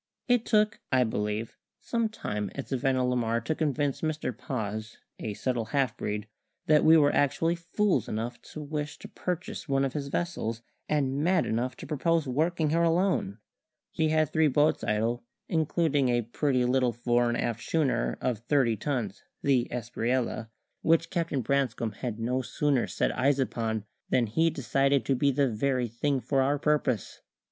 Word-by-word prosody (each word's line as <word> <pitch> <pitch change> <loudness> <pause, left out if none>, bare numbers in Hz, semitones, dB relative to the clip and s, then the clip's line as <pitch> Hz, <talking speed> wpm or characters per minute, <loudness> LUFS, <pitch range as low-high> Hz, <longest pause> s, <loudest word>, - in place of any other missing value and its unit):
It 245 -2 +2
took 210 -2 +3
(I 130 -1 +4
believe) 105 0 -2 0.2
some 230 -2 -1
time 105 - -4
at 140 - -6
Savannah 130 -1 +1
la 125 0 +1
Mar 115 -1 +1
to 115 - -1
convince 145 -3 -1
Mr 155 -6 -2
Paz, 110 -3 -4 0.2
a 105 -2 -4
subtle 125 -2 -1
half 130 0 0
breed, 105 -2 -3 0.4
that 150 -1 +5
we 160 +1 +7
were 145 -2 +4
actually 155 +4 +2
fools 170 - 0
enough 115 +3 -4
to 155 - -6
wish 150 0 -4
to - - -10
purchase 180 -3 -5
one 135 0 +2
of 135 - -3
his 145 -2 -3
vessels, 120 -8 -2 0.3
and 140 -1 +1
mad 180 0 +3
enough 120 +3 -1
to - - -8
propose 165 0 +1
working 155 +4 +1
her 165 +1 +2
alone. 170 - +1 0.5
He 160 -1 +1
had 155 -2 +2
three 160 -1 +4
boats 150 +2 +2
idle, 115 +3 0 0.2
including 155 -4 +1
a 120 -1 +2
pretty 125 +2 0
little 125 -1 +2
fore 120 +1 +1
and 120 - 0
aft 115 -1 -2
schooner 135 -7 0
of 125 -4 0
thirty 125 -1 +2
tons, 115 -4 -3 0.2
the 130 -4 +3
Espriella, 120 -1 -2 0.3
which 165 0 +2
Captain 165 -6 -1
Branscome 125 -3 0
had 115 +1 -5
no 125 +3 0
sooner 135 0 0
set - - -1
eyes 135 +2 +3
upon 115 -5 -1 0.2
than 125 - +3
he 160 +10 +2
decided 135 0 +1
to 135 - +2
be 140 +3 +2
the 140 0 +2
very 125 +2 0
thing 135 +5 -1
for 135 +1 +1
our 140 +2 +2
purpose. 145 -7 0
135 Hz, 170 wpm, -28 LUFS, 120-150 Hz, 0.5 s, we